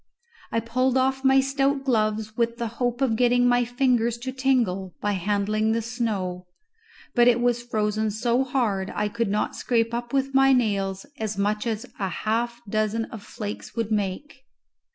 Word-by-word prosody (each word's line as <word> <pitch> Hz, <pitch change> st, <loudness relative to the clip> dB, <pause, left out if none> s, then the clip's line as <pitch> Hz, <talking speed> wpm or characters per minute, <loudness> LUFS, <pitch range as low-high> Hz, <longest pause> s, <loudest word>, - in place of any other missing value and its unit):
I 230 Hz, -, +1 dB
pulled 255 Hz, +3 st, +1 dB
off 265 Hz, +1 st, +1 dB
my 270 Hz, 0 st, +5 dB
stout 275 Hz, 0 st, 0 dB
gloves 215 Hz, -3 st, 0 dB
with 235 Hz, 0 st, 0 dB
the 235 Hz, -, -2 dB, 0.2 s
hope 245 Hz, +1 st, 0 dB
of 250 Hz, -5 st, +2 dB
getting 245 Hz, +1 st, +3 dB
my 245 Hz, 0 st, +4 dB
fingers 245 Hz, -2 st, +1 dB
to 260 Hz, -, -2 dB
tingle 240 Hz, -9 st, 0 dB
by 205 Hz, -, 0 dB
handling 210 Hz, +3 st, 0 dB
the 230 Hz, -, 0 dB
snow; 200 Hz, -7 st, -3 dB, 0.7 s
but 240 Hz, -1 st, +5 dB
it 240 Hz, -1 st, +5 dB
was 240 Hz, 0 st, +1 dB
frozen 215 Hz, -2 st, -1 dB
so 235 Hz, +4 st, +1 dB
hard 220 Hz, -8 st, -1 dB
I 210 Hz, -, 0 dB
could 230 Hz, 0 st, -2 dB
not 210 Hz, +1 st, -1 dB
scrape 230 Hz, -1 st, 0 dB
up 240 Hz, 0 st, -3 dB
with 275 Hz, 0 st, 0 dB
my 270 Hz, 0 st, +5 dB
nails 195 Hz, -6 st, 0 dB
as 215 Hz, -2 st, -3 dB
much 210 Hz, +3 st, 0 dB
as 220 Hz, -1 st, -2 dB
a 195 Hz, -2 st, -1 dB
half 235 Hz, +4 st, -2 dB
dozen 215 Hz, +2 st, 0 dB
of 225 Hz, -, -7 dB
flakes 210 Hz, -1 st, -7 dB
would 225 Hz, -2 st, -2 dB
make. 215 Hz, +7 st, -3 dB
230 Hz, 175 wpm, -25 LUFS, 210-245 Hz, 0.7 s, my